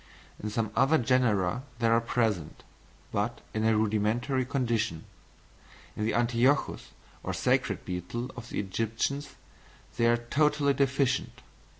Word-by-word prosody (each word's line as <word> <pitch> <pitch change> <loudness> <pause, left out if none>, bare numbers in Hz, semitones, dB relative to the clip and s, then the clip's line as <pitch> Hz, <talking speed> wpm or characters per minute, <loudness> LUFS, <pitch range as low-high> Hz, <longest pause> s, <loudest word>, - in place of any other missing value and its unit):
In 105 - -3
some 110 0 -1
other 135 +5 +4
genera 120 - +2 0.2
they 115 - -1
are 115 0 +4
present, 110 -9 -1 0.5
but 105 +4 -1
in 110 - -1
a 110 -1 +3
rudimentary 110 +5 +1
condition. 120 - -1 0.9
In 105 - -2
the 110 - 0
Ateuchus 120 +4 +2 0.3
or - - -3
sacred - - +1
beetle 95 +8 -4
of 120 -2 -9
the - - -3
Egyptians, 115 +8 -2 0.6
they 115 -1 +3
are 120 0 +4
totally 140 +4 +2
deficient. 135 -1 0
115 Hz, 125 wpm, -29 LUFS, 110-130 Hz, 0.9 s, other